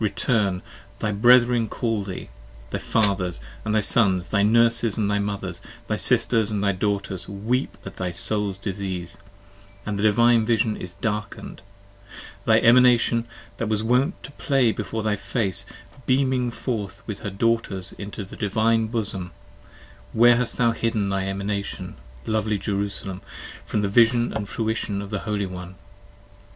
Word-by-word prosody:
return! 100 -3 0 0.3
Thy 105 - -1
brethren 120 +1 +4
call 115 -4 -1
thee, 95 -2 -5
and - - -20 0.4
thy - - -1
fathers, 100 - 0 0.2
and 110 0 -1
thy 110 - +3
sons, 95 -5 +3
Thy 100 - +2
nurses 115 +1 +3
and 105 -2 0
thy 100 - +1
mothers, 100 -3 -4 0.2
thy 105 - -1
sisters 115 -2 +3
and 105 -2 -1
thy 100 - +3
daughters 100 -1 -2
Weep 110 +7 -2
at - - -9
thy 90 - -2
soul's 100 +2 +1
disease, 95 -3 -4 0.7
and 105 -1 -3
the - - -1
Divine 115 +2 +4
Vision 110 -1 +1
is 90 -1 -8
darken'd: 105 -2 -4 0.8
Thy - - +5
Emanation 120 -1 +5 0.3
that 115 - -2
was 110 0 0
wont 125 - +1
to 135 - -9
play 135 -5 +1
before 110 0 -4
thy 105 -1 +1
face, 100 -1 -1 0.2
15 - - -20
Beaming 130 -1 +2
forth 115 -4 -4
with 105 -3 -6
her 100 - -4
daughters 100 -2 -1
into 100 0 -6
the - - -11
Divine 110 +2 +1
bosom, 100 -5 -3 0.8
Where 120 +1 +6
hast 125 -1 -1
thou 120 -1 +3
hidden 115 -3 -1
thy 95 0 -1
Emanation 100 +1 -4 0.3
lovely 110 -1 0
Jerusalem 100 -1 -4 0.5
From 105 - 0
the - - +1
vision 120 +3 +3
and 105 -2 -4
fruition 110 -2 -2
of 100 0 -7
the 105 - -2
Holy 105 -1 0
one? 90 0 -8
105 Hz, 155 wpm, -24 LUFS, 100-115 Hz, 0.8 s, Where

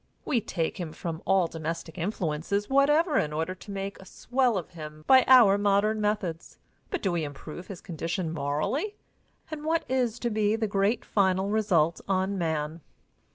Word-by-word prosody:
We 240 -5 +1
take 175 -4 -3
him 165 -3 -5
from 165 -2 -5
all 195 -2 +4
domestic 165 0 -5
influences 185 +1 -2
whatever 295 +3 +3
in 150 - -1
order 160 +4 -2
to 185 - -14
make 195 0 -5
a - - -13
swell 245 +1 0
of 175 - -5
him 155 -2 -9
by 260 -1 +7
our 230 -6 +7
modern 205 +2 +2
methods, 205 -6 -2 0.3
but 380 - -3
do 190 - +1
we 170 -2 -1
improve 150 +4 -8
his 190 -4 -8
condition 165 0 -3
morally, 155 - -1 0.6
and 305 -1 -5
what 320 +1 0
is 250 -3 0
to 240 - -1
be 215 0 +2
the 225 0 -1
great 205 +3 0
final 190 -1 +1
result 185 -7 +2
on 190 0 0
man? 160 -2 -2
195 Hz, 170 wpm, -27 LUFS, 165-220 Hz, 0.6 s, by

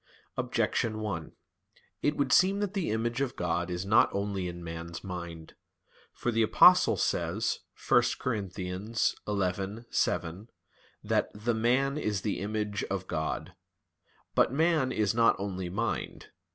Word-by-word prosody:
Objection 110 -2 0
1: 100 -7 -4 0.7
It 145 +1 +1
would 135 -3 +1
seem 195 +2 +5
that 205 -1 -2
the 195 -4 -1
image 115 +3 -1
of 135 -3 -1
God 85 0 -1
is 90 +1 -3
not 110 +4 +5
only 100 -2 -2
in 85 0 -7
man's 85 0 -6
mind. 85 -4 -7 0.6
For 120 - -2
the 115 0 +2
Apostle 110 - +6
says - - 0 0.3
(1 120 - +6 0.2
Cor. 130 - -1
11:7) 100 0 -2 0.6
that - - +1
"the 110 +3 -1
man 130 +6 +1
is 105 -7 -1
the 105 -1 -2
image... 105 0 -2
of 95 -1 -3
God." 80 -3 -3 0.8
But - - +3
man 155 -2 +2
is 105 -4 +1
not 115 0 +4
only 95 -2 -3
mind. 110 +6 -3
105 Hz, 135 wpm, -29 LUFS, 90-120 Hz, 0.8 s, Apostle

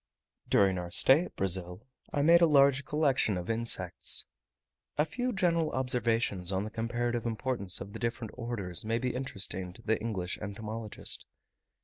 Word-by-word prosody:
During 95 -2 +3
our 90 -1 -5
stay 135 - +5
at - - -12
Brazil 90 +2 -1 0.3
I 145 - 0
made 170 +3 +6
a 170 - +6
large 140 -2 +4
collection 140 -10 +1
of 90 +4 -3
insects. 110 -6 +3 0.7
A 150 - +3
few 250 +10 -2
general 170 -6 +1
observations 115 -7 0
on 95 +1 0
the 105 - -6
comparative 120 +1 -2
importance 115 -4 -1
of 100 +1 -8
the - - -7
different 115 -2 -3
orders 105 -8 -3
may 115 +1 0
be 125 +1 -2
interesting 95 -7 -4
to 115 - -16
the 110 -1 0
English 95 -5 -3
entomologist. 110 +1 -6
115 Hz, 155 wpm, -30 LUFS, 100-130 Hz, 0.7 s, made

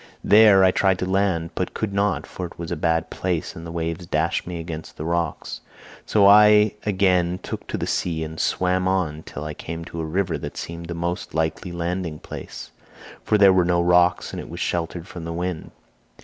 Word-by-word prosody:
"There 105 -2 +7
I 95 - +6
tried 95 0 +2
to 90 - -2
land, 95 -3 0
but - - -3
could 105 -3 -2
not, 100 +1 0
for 90 -2 -6
it - - -16
was 85 0 -6
a - - 0
bad 80 0 0
place 90 -4 -2
and 85 0 -8
the - - -7
waves 85 +1 -4
dashed - - 0
me 90 -2 -5
against 80 -1 -7
the 75 - -5
rocks, 85 -2 -2 0.5
so 105 -2 +4
I 105 +1 +7
again 90 -3 +2
took - - -6
to - - -3
the - - -2
sea 80 -2 -1
and 80 0 -7
swam 90 0 +1
on 90 -5 0
till 75 - -8
I 75 0 -5
came 85 +2 -7
to 85 0 -6
a - - -3
river 90 +4 -1
that - - -7
seemed 85 0 -6
the 85 - -5
most 85 0 -4
likely 80 +3 -1
landing 85 -1 -3
place, - - -9 0.5
for 105 - +2
there 100 -2 +7
were 95 -1 +4
no 85 0 +2
rocks 90 0 +3
and - - -4
it - - -8
was - - -7
sheltered 85 0 -2
from 90 -5 -8
the 85 0 -4
wind. 90 -1 -4
85 Hz, 210 wpm, -23 LUFS, 85-95 Hz, 0.5 s, There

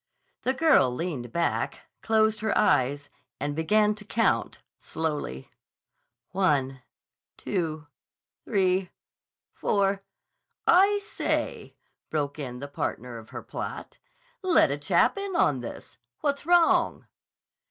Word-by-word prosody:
The 260 - 0
girl 310 - +5
leaned 125 -3 -4
back, 170 +4 -1 0.2
closed 220 -1 +2
her 215 0 0
eyes, 145 -7 +2 0.3
and 145 +1 -2
began 210 +6 +3
to 210 0 -11
count 225 +2 0 0.2
slowly: 150 - -4 0.8
"One—two—three—four—" 155 +1 -2 2.8
"I 395 +4 +5
say," 410 +1 -3 0.3
broke 145 -1 -2
in 125 -4 -5
the 140 +3 -6
partner 125 -4 -4
of 110 - -14
her - - -7
plot. - - -7 0.4
"Let 365 - +4
a 140 - -1
chap 170 - +2
in 395 -2 -4
on 145 - +3
this. 120 -2 -9 0.2
What's 285 +1 -1
wrong?" 345 -1 +3
165 Hz, 100 wpm, -27 LUFS, 140-225 Hz, 2.8 s, girl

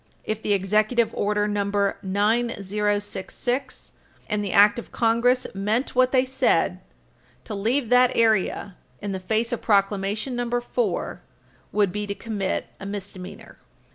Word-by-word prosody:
If 215 0 -3
the 210 - -2
Executive 215 +4 +2
Order 210 0 0
No. 205 -1 0 0.4
9066 205 +3 -1 0.3
and 210 -1 -1
the 200 - -3
Act 205 +2 +6
of - - -11
Congress 240 +2 +2
meant 210 +6 -1
what 255 0 +3
they 260 -1 +3
said, 250 -9 +1 0.6
to 220 - -7
leave 230 +5 0
that 250 0 +5
area, 215 -3 +1 0.2
in 205 -1 -4
the 190 - -3
face 220 +5 -1
of 240 - -2
Proclamation 205 +4 +1
No. 245 0 -1
4, 355 - -2 0.5
would 205 -3 +2
be 210 +2 -3
to 200 - -3
commit 200 -2 -2
a 195 - -8
misdemeanor. 195 -2 -8
210 Hz, 140 wpm, -24 LUFS, 200-240 Hz, 0.6 s, Act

